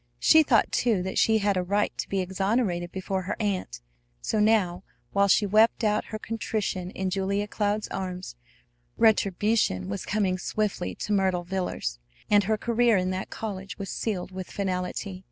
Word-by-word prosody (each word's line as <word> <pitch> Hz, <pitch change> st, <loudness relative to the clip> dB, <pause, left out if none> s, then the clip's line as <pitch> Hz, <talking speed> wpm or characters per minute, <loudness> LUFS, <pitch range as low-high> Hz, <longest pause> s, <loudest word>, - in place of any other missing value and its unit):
She 315 Hz, -, +6 dB
thought, 245 Hz, -8 st, +3 dB
too, 220 Hz, -7 st, +1 dB
that 190 Hz, -, -1 dB
she 220 Hz, -1 st, +4 dB
had 205 Hz, -1 st, +1 dB
a -, -, +2 dB
right 200 Hz, +3 st, 0 dB
to -, -, -3 dB
be 195 Hz, -1 st, 0 dB
exonerated 190 Hz, -1 st, -1 dB
before 190 Hz, 0 st, -3 dB
her 185 Hz, +3 st, -3 dB
aunt. 190 Hz, -, -2 dB, 0.4 s
So 215 Hz, -, -1 dB
now, 200 Hz, -4 st, +2 dB, 0.3 s
while 200 Hz, 0 st, +3 dB
she 200 Hz, +2 st, +4 dB
wept 215 Hz, +4 st, +3 dB
out 210 Hz, -1 st, +1 dB
her 215 Hz, -, -5 dB
contrition 215 Hz, -4 st, -3 dB
in 190 Hz, 0 st, -3 dB
Julia 200 Hz, +2 st, -1 dB
Cloud's 210 Hz, 0 st, -1 dB
arms, 185 Hz, -5 st, -5 dB, 0.6 s
retribution 205 Hz, -, +2 dB
was 100 Hz, -, -4 dB
coming 190 Hz, -3 st, 0 dB
swiftly 195 Hz, -, -2 dB
to 210 Hz, -, -3 dB
Myrtle 190 Hz, -3 st, +1 dB
Villers; 180 Hz, -, -3 dB, 0.3 s
and 205 Hz, -1 st, +5 dB
her 215 Hz, +1 st, +1 dB
career 235 Hz, 0 st, +2 dB
in 185 Hz, 0 st, 0 dB
that 185 Hz, +1 st, -4 dB
college 195 Hz, -3 st, -6 dB
was 195 Hz, -2 st, -5 dB
sealed 190 Hz, -5 st, -3 dB
with 185 Hz, -1 st, -7 dB
finality. 185 Hz, 0 st, -3 dB
195 Hz, 170 wpm, -26 LUFS, 185-215 Hz, 0.6 s, She